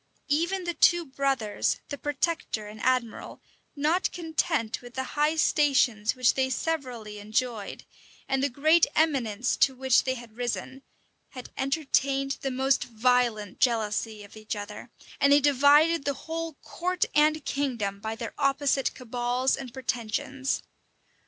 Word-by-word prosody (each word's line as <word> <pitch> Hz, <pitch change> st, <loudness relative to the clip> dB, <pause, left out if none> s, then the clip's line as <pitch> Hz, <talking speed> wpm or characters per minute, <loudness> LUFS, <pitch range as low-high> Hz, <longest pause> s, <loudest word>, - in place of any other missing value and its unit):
Even 345 Hz, +5 st, +1 dB
the 345 Hz, 0 st, -2 dB
two 345 Hz, 0 st, +4 dB
brothers, 265 Hz, -6 st, -1 dB
the 285 Hz, -, -4 dB
protector 290 Hz, -7 st, -2 dB
and 215 Hz, +1 st, -10 dB
admiral, 255 Hz, -3 st, -1 dB, 0.4 s
not 310 Hz, +6 st, +1 dB
content 320 Hz, -8 st, -1 dB
with 245 Hz, -1 st, -13 dB
the 260 Hz, -, -1 dB
high 300 Hz, +2 st, +2 dB
stations 260 Hz, -9 st, +2 dB
which 255 Hz, -2 st, +3 dB
they 265 Hz, -1 st, 0 dB
severally 250 Hz, -7 st, -3 dB
enjoyed, 215 Hz, 0 st, -3 dB, 0.4 s
and 270 Hz, 0 st, 0 dB
the 280 Hz, -, +1 dB
great 310 Hz, +6 st, +4 dB
eminence 255 Hz, -7 st, +1 dB
to 265 Hz, -, +3 dB
which 260 Hz, -1 st, +3 dB
they 260 Hz, 0 st, -1 dB
had 235 Hz, -3 st, -11 dB
risen, 250 Hz, +2 st, -4 dB, 0.5 s
had 255 Hz, -3 st, -9 dB
entertained 275 Hz, -1 st, 0 dB
the 270 Hz, -, -1 dB
most 265 Hz, +1 st, +1 dB
violent 235 Hz, -3 st, +1 dB
jealousy 220 Hz, -3 st, 0 dB
of 205 Hz, -, -14 dB
each 215 Hz, 0 st, -5 dB
other; 210 Hz, +3 st, -8 dB, 0.3 s
and 280 Hz, -, +4 dB
they 285 Hz, -, +7 dB
divided 290 Hz, +3 st, +4 dB
the 280 Hz, 0 st, -1 dB
whole 325 Hz, -1 st, -4 dB
court 365 Hz, +1 st, -1 dB
and 305 Hz, 0 st, +3 dB
kingdom 235 Hz, -8 st, -2 dB
by 220 Hz, +2 st, -4 dB
their 230 Hz, -1 st, -6 dB
opposite 275 Hz, -1 st, +1 dB
cabals 245 Hz, +1 st, 0 dB
and 265 Hz, -3 st, -8 dB
pretensions. 260 Hz, +2 st, -2 dB
265 Hz, 140 wpm, -27 LUFS, 235-290 Hz, 0.5 s, they